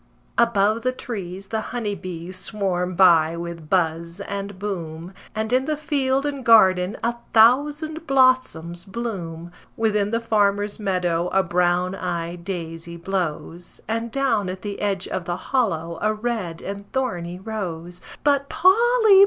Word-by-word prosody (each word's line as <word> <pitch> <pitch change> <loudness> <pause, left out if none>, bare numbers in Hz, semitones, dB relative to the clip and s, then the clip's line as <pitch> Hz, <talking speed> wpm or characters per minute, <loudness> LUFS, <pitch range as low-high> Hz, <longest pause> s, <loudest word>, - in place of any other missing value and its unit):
Above 220 -1 +3
the 255 +2 +1
trees 195 -6 -6
the 220 -1 -1
honey 225 -4 -2
bees 180 -1 -6
swarm 185 -2 -1
by 170 -3 +5
with 170 -2 -7
buzz 170 0 0
and 200 0 -5
boom, 175 -3 -5 0.2
And 220 +2 -2
in 260 +1 +3
the 305 0 -1
field 275 -3 0
and 280 -2 -3
garden 190 -4 +5
a 235 +1 0 0.2
thousand 295 +8 +4
blossoms 255 -11 +2
bloom. 185 -6 -5 0.3
Within 210 -2 +1
the 230 +1 0
farmer's 205 -2 +1
meadow 180 -4 0
a 190 +1 +2
brown 180 +1 +1
eyed 175 -2 -4
daisy 170 -2 -6
blows, 175 -1 -4
And 230 +1 -2
down 225 -8 +1
at 185 +1 -6
the 205 -1 -5
edge 195 -2 -1
of 185 -2 -3
the 175 0 -2
hollow 170 -9 -1
a 215 - +2
red 210 -7 -3
and 200 +1 -7
thorny 180 -10 -2
rose. 180 -4 -5 0.2
But 280 -1 +2
Polly! 440 +1 +5
195 Hz, 145 wpm, -23 LUFS, 175-235 Hz, 0.3 s, by